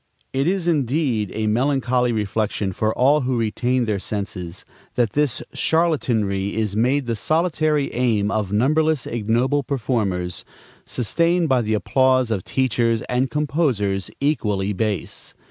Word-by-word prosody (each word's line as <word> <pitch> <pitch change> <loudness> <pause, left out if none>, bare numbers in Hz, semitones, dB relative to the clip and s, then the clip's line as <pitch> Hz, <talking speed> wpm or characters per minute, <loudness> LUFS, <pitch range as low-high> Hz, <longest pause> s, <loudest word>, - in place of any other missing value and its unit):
It 135 +3 +1
is 185 -1 0
indeed 135 - +1
a 110 0 -1
melancholy 125 +1 +1
reflection, 105 -2 -1
for 110 +4 0
all 140 +4 +4
who 130 -1 0
retain 120 +3 0
their 105 -3 -1
senses, 95 -3 -5 0.3
that 120 -4 +1
this 145 -4 0
charlatanry 115 - +1
is 110 -2 -1
made 130 +5 +2
the 115 -1 -1
solitary 155 - +1
aim 110 -4 +1
of 105 -4 -1
numberless 150 +6 +2
ignoble 120 +5 0
performers, 105 - -2 0.4
sustained 170 +7 +1
by 130 -2 +3
the 110 -1 0
applause 130 +4 +2
of 100 -5 -1
teachers 120 -3 0
and 125 +1 0
composers 125 - 0
equally 105 -9 0
base. 105 -3 -3
120 Hz, 130 wpm, -22 LUFS, 105-140 Hz, 0.4 s, all